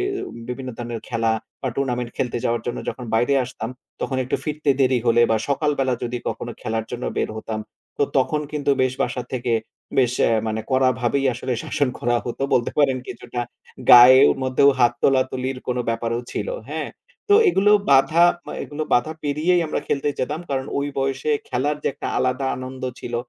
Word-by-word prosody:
এ -, -, 0 dB, 0.5 s
বিভিন্ন 130 Hz, +1 st, -5 dB
ধরনের 120 Hz, -1 st, -5 dB
খেলা 115 Hz, -2 st, +1 dB, 0.3 s
বা 130 Hz, -, -1 dB
টুর্নামেন্ট 125 Hz, -3 st, -1 dB
খেলতে 120 Hz, -2 st, -1 dB
যাওয়ার 115 Hz, -2 st, 0 dB
জন্য 120 Hz, -, -2 dB
যখন 125 Hz, -, -4 dB
বাইরে 120 Hz, +5 st, +3 dB
আসতাম 120 Hz, -2 st, -6 dB, 0.3 s
তখন 130 Hz, -, -2 dB
একটু 130 Hz, -, -1 dB
ফিরতে 150 Hz, -1 st, 0 dB
দেরি 130 Hz, -1 st, +3 dB
হলে 120 Hz, 0 st, +4 dB
বা 110 Hz, -, +4 dB
সকালবেলা 140 Hz, -3 st, +1 dB
যদি 120 Hz, 0 st, -2 dB
কখনো 120 Hz, 0 st, -5 dB
খেলার 110 Hz, 0 st, -2 dB
জন্য 125 Hz, 0 st, -5 dB
বের -, -, 0 dB
হতাম, 110 Hz, 0 st, -4 dB, 0.4 s
তো -, -, +3 dB, 0.2 s
তখন 150 Hz, +3 st, +1 dB
কিন্তু 145 Hz, -1 st, 0 dB
বেশ 130 Hz, 0 st, +1 dB
বাসা 125 Hz, 0 st, -2 dB
থেকে 125 Hz, -2 st, -1 dB, 0.5 s
বেশ 125 Hz, -2 st, +3 dB
অ্যা -, -, +3 dB
মানে 110 Hz, 0 st, -2 dB
কড়াভাবেই 130 Hz, +1 st, +2 dB
আসলে 125 Hz, +1 st, -3 dB
শাসন 145 Hz, -3 st, 0 dB
করা 120 Hz, 0 st, +1 dB
হত। 120 Hz, -, -5 dB, 0.2 s
বলতে 120 Hz, -, +1 dB
পারেন 135 Hz, -3 st, +4 dB
কিছুটা 120 Hz, 0 st, -6 dB, 0.5 s
গায়ের 125 Hz, -, +9 dB
মধ্যেও 130 Hz, +2 st, +4 dB
হাত 120 Hz, -1 st, +4 dB
তোলাতুলির 130 Hz, -1 st, +1 dB
কোনো 125 Hz, 0 st, 0 dB
ব্যাপারও 115 Hz, +1 st, -1 dB
ছিল, -, -, -3 dB, 0.2 s
হ্যাঁ। -, -, -3 dB, 0.4 s
তো 410 Hz, -, +6 dB
এগুলো 205 Hz, -, +4 dB, 0.2 s
বাধা 155 Hz, +5 st, +5 dB, 0.4 s
এগুলো 150 Hz, +1 st, -5 dB
বাঁধা 125 Hz, +6 st, +2 dB
পেরিয়েই 155 Hz, +5 st, +2 dB
আমরা -, -, -2 dB
খেলতে 145 Hz, +1 st, 0 dB
যেতাম। 150 Hz, +5 st, -2 dB
কারণ 135 Hz, -1 st, -1 dB
ওই 140 Hz, -, -1 dB
বয়সে 135 Hz, +2 st, -1 dB, 0.2 s
খেলার 145 Hz, +4 st, 0 dB
যে -, -, +1 dB
একটা 140 Hz, -, -6 dB
আলাদা 130 Hz, +1 st, 0 dB
আনন্দ 130 Hz, +1 st, -8 dB, 0.2 s
ছিল, 120 Hz, -, -6 dB
130 Hz, 175 wpm, -22 LUFS, 120-140 Hz, 0.5 s, গায়ের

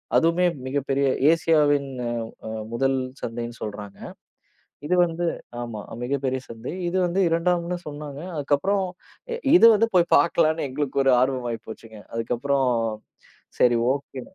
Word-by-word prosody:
அதுவுமே 170 Hz, +2 st, +3 dB, 0.2 s
மிகப் 140 Hz, +1 st, -2 dB
பெரிய 140 Hz, +1 st, +2 dB, 0.3 s
ஏசியவின் 150 Hz, -4 st, +2 dB, 0.2 s
அ, -, -, -1 dB, 0.4 s
அ -, -, -5 dB, 0.2 s
1 135 Hz, +2 st, +1 dB, 0.2 s
சந்தைன்னு 120 Hz, 0 st, -5 dB
சொல்றாங்க. 105 Hz, -1 st, -7 dB, 0.9 s
இது 180 Hz, -, +1 dB
வந்து 170 Hz, 0 st, -2 dB, 0.4 s
ஆமா. 115 Hz, -3 st, -6 dB, 0.2 s
மிகப்பெரிய 130 Hz, 0 st, -1 dB
சந்தை. 115 Hz, +5 st, -7 dB, 0.2 s
இது 185 Hz, -, -2 dB
வந்து 175 Hz, +3 st, 0 dB
2ம்னு 170 Hz, +1 st, 0 dB
சொன்னாங்க. 145 Hz, -1 st, -7 dB, 0.2 s
அதுக்கப்புறம் 150 Hz, +8 st, +1 dB, 0.5 s
அ, -, -, -1 dB, 0.2 s
இது 230 Hz, -, +8 dB
வந்து 225 Hz, +2 st, +2 dB
போய்ப் 175 Hz, -2 st, +3 dB
பார்க்கலாம்னு 160 Hz, -3 st, +2 dB
எங்களுக்கு 140 Hz, 0 st, -1 dB
ஒரு 135 Hz, -, +5 dB
ஆர்வம் 130 Hz, -1 st, 0 dB
ஆயிப்போச்சுங்க. 110 Hz, -1 st, -9 dB
அதுக்கப்புறம் 125 Hz, +3 st, 0 dB, 0.9 s
சரி 120 Hz, -1 st, +5 dB, 0.2 s
ஓகே 140 Hz, -1 st, -7 dB
140 Hz, 130 wpm, -24 LUFS, 125-165 Hz, 0.9 s, இது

